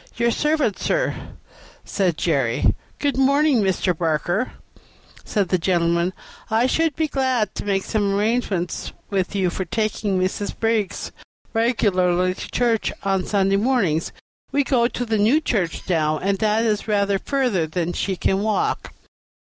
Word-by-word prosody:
"Your 235 0 +2
servant, 300 -6 +1
sir," - - 0 0.7
said 180 -6 0
Jerry. 135 -8 +1 0.2
"Good 285 -2 -1
morning, 280 -1 +3
Mr. 185 -2 +1
Barker," 170 - -1 0.7
said 200 -4 -1
the 185 - +2
gentleman. 170 0 +1 0.4
"I 225 +2 +3
should 320 +3 +1
be 315 -1 0
glad 260 -7 0
to - - -6
make 195 -1 0
some 200 -2 0
arrangements 205 -4 -1 0.2
with 195 0 -1
you 185 -3 +1
for 190 - -3
taking 215 -1 -1
Mrs. 185 +2 -2
Briggs 225 -3 -1 0.4
regularly 185 -6 +2
to - - -8
church 235 -3 +1
on 195 -2 0
Sunday 195 -1 +2
mornings. 200 -9 +1 0.4
We 285 - +2
go 245 -3 +2
to 245 0 -4
the 220 -2 0
New 230 +9 +4
Church 195 - -2
now, 155 -3 +1
and 195 +3 -1
that 215 +2 +2
is 210 -1 0
rather 200 -2 +1
further 245 - 0
than 175 +2 -2
she 195 - -1
can 190 +2 0
walk." 215 0 -1
205 Hz, 145 wpm, -22 LUFS, 185-235 Hz, 0.7 s, New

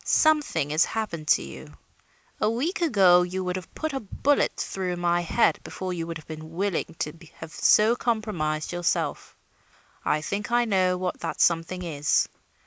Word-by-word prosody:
Something 295 - +2
has 155 +3 +4
happened 170 -9 -4
to - - +4
you. - - -10 0.6
A 215 - +2
week 310 - -2
ago 195 - +5
you 185 +1 -2
would 180 0 -2
have 185 -2 -8
put 315 -2 -3
a 270 - -1
bullet 275 +6 +1
through 185 -2 -3
my 175 0 +1
head 175 +7 +2
before 185 -1 -5
you 165 -2 -4
would 165 -1 -4
have 155 - -14
been 155 +1 -9
willing 190 -3 -2
to 150 - -3 0.2
have 160 -1 -10
so 220 +3 +4
compromised 205 -11 -1
yourself. 175 -1 -2 0.7
I 150 - +1
think 200 +7 -3
I 240 0 +3
know 185 -4 +2
what 180 0 -3
that - - -4
something 170 +2 +1
is. 150 -4 +1
180 Hz, 170 wpm, -26 LUFS, 165-215 Hz, 0.7 s, ago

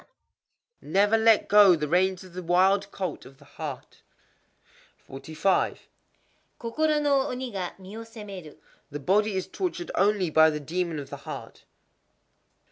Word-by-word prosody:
_ - - -23 0.8
Never 200 +7 +2
let 225 -1 +4
go 205 -3 +7
the 150 -2 -3
reins 185 +3 +1
of 185 -2 -14
the 185 - -6
wild 190 +3 +2
colt 190 -2 -5
of 135 +1 -15
the 140 - -19
heart. 145 -3 -8 1.1
45.—Kokoro 195 - -3
no 280 -2 +2
oni 255 -2 -5
ga 185 -3 -4
mi 190 +2 -11
wo 225 - -7
séméru. 205 -8 -10 0.3
The 145 - -6
body 205 +8 +1
is 190 - -2
tortured 355 -2 -4
only 195 -3 +1
by 160 +1 +6
the 150 -1 -3
demon 170 +2 -3
of 140 -2 -8
the - - -6
heart. - - -9
190 Hz, 145 wpm, -26 LUFS, 160-215 Hz, 1.1 s, go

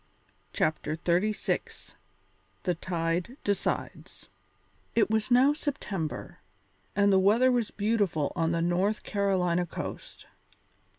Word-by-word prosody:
CHAPTER 155 0 0
XXXVI 180 +6 -1 0.7
THE 180 - +1
TIDE 170 - -2
DECIDES 200 -2 -3 0.7
It 225 -2 +3
was 220 +1 +1
now 255 +4 +5
September, 210 - -4 0.6
and 200 0 +4
the 190 - +6
weather 225 +7 +4
was 240 -3 +1
beautiful 200 -9 0
on 165 -2 +1
the 165 0 0
North 185 +5 +1
Carolina 180 -4 +1
coast. - - -7
195 Hz, 105 wpm, -28 LUFS, 170-220 Hz, 0.7 s, the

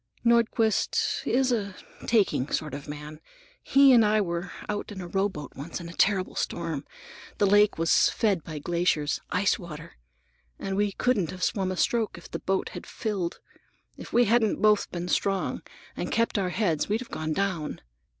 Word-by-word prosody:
Nordquist 235 -2 +2
is 260 0 +2
a 200 -5 -1 0.3
taking 195 - +2
sort 150 -3 -2
of 140 +1 -7
man. 150 +1 -8 0.4
He 275 -1 +6
and 235 -2 +7
I 215 0 +3
were 175 -2 -2 0.2
out 210 0 -3
in 200 - -7
a 180 - -6
rowboat 190 -5 -2
once 155 +7 -6
in 170 - -8
a - - -9
terrible 190 0 +2
storm. 165 -4 -3 0.5
The 205 - +3
lake 205 +1 +4
was 165 0 +4
fed 200 -8 0
by 155 -2 -7
glaciers,—ice 170 +3 0
water,—and 150 - -10
we 205 0 +1
couldn't 215 -9 +1
have 185 0 -6
swum 190 -2 0
a 185 - -4
stroke 230 +1 0
if - - -13
the - - -4
boat 190 0 -1
had - - -9
filled. 195 -6 -3 0.5
If - - -10
we 240 0 +4
hadn't 225 0 +2
both 210 -1 +3
been 175 0 -4
strong 195 +1 0 0.3
and - - -4
kept 230 -2 +1
our 185 -2 0
heads, 180 -5 0
we'd 215 +3 0
have 255 - -10
gone 155 0 -2
down. 185 -4 -2
190 Hz, 170 wpm, -27 LUFS, 165-215 Hz, 0.5 s, and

